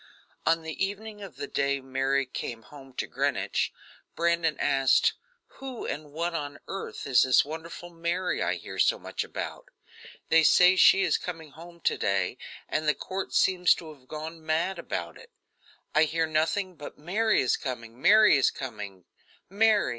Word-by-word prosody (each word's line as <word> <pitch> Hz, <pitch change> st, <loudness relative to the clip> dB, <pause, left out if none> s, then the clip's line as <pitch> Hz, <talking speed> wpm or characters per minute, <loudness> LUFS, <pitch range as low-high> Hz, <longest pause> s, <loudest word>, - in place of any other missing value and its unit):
On 165 Hz, 0 st, +3 dB
the 160 Hz, +3 st, -3 dB
evening 210 Hz, +2 st, -5 dB
of 195 Hz, -, -9 dB
the -, -, -5 dB
day 140 Hz, 0 st, 0 dB
Mary 135 Hz, +1 st, 0 dB
came 120 Hz, -2 st, -6 dB
home 135 Hz, +1 st, -14 dB
to -, -, -3 dB
Greenwich, -, -, -1 dB, 0.4 s
Brandon 170 Hz, -2 st, +1 dB
asked: 135 Hz, -2 st, +3 dB, 0.5 s
"Who 265 Hz, -3 st, -6 dB
and 150 Hz, 0 st, -5 dB
what 170 Hz, +3 st, -2 dB
on 145 Hz, -3 st, -4 dB
earth 195 Hz, -, -6 dB
is 130 Hz, -3 st, +4 dB
this 130 Hz, 0 st, +4 dB
wonderful 165 Hz, +3 st, -8 dB
Mary 170 Hz, +2 st, -2 dB
I -, -, +1 dB
hear -, -, -8 dB
so -, -, +4 dB
much -, -, -4 dB
about? -, -, -6 dB, 0.6 s
They 165 Hz, -, +6 dB
say 180 Hz, +3 st, +6 dB
she 195 Hz, +1 st, +6 dB
is -, -, +2 dB
coming 165 Hz, -4 st, -7 dB
home 170 Hz, +3 st, -13 dB
to -, -, 0 dB
day, 95 Hz, -2 st, 0 dB, 0.3 s
and 155 Hz, 0 st, -2 dB
the 150 Hz, -, +3 dB
court 190 Hz, 0 st, -5 dB
seems 180 Hz, -1 st, +4 dB
to 160 Hz, -2 st, -9 dB
have 130 Hz, -3 st, -22 dB
gone 160 Hz, +2 st, -7 dB
mad 165 Hz, +4 st, 0 dB
about 85 Hz, -, -5 dB
it; -, -, -15 dB, 0.6 s
I 155 Hz, +1 st, +5 dB
hear 165 Hz, +1 st, 0 dB
nothing 165 Hz, +5 st, 0 dB
but 145 Hz, -, -9 dB
'Mary 205 Hz, +7 st, +1 dB
is 125 Hz, -, +2 dB
coming! 120 Hz, -2 st, -6 dB
Mary 210 Hz, -2 st, +7 dB
is 135 Hz, -, +4 dB
coming! 105 Hz, -8 st, -7 dB, 0.5 s
Mary! 215 Hz, +1 st, +3 dB
160 Hz, 170 wpm, -27 LUFS, 140-180 Hz, 0.6 s, Mary